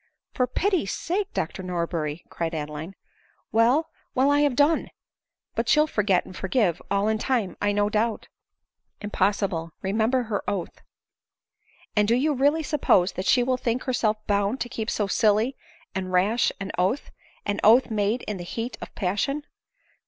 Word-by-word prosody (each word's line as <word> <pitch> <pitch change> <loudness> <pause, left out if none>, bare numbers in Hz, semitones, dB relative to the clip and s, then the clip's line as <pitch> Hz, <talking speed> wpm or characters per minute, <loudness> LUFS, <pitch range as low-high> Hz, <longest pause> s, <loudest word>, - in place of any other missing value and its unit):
" - - -60
For 250 - +1
pity's 350 - 0
sake, 385 +4 -2
Dr 165 +4 -3
Norberry! 170 -3 -3
" - - -37
cried 165 -1 -3
Adeline. 150 +4 -5 0.3
" - - -39
Well, 245 +8 +3 0.2
well, 270 +2 +4
I 290 - +4
have 290 -3 +2
done. 295 +4 +3 0.6
But - - -1
she'll 300 0 +5
forget 205 -10 +1
and 185 - -11
for 190 - -4
give 190 -5 +1
all 200 +1 +1
in 220 0 +1
time, 230 -6 0
I 205 - +2
do 205 - 0
not 205 0 +1
doubt." 220 0 0 0.4
" - - -60 0.3
Impossible; 195 -4 0
remember 220 +6 +1
her 215 -3 -3
oath." 195 -4 -4 0.6
" - - -34
And 210 -1 +3
do 230 - +4
you 295 +5 +2
really 290 +4 +2
suppose 200 - +3
that 185 - -4
she 245 - +5
will 255 +1 +1
think 245 0 -1
herself 230 -5 +1
bound 205 +4 +1
to 245 - -2
keep 225 -1 -3
so 210 - 0
silly 215 +5 +2 0.4
and 185 -1 -3
rash 200 +6 +2
an 195 0 -4
oath; 195 +10 0 0.3
an 205 0 -1
oath 235 +3 +6
made 215 +3 0
in 210 - -4
the 175 - -6
heat 230 +7 -5
of - - -9
passion 230 +10 -1
215 Hz, 180 wpm, -25 LUFS, 190-255 Hz, 0.6 s, oath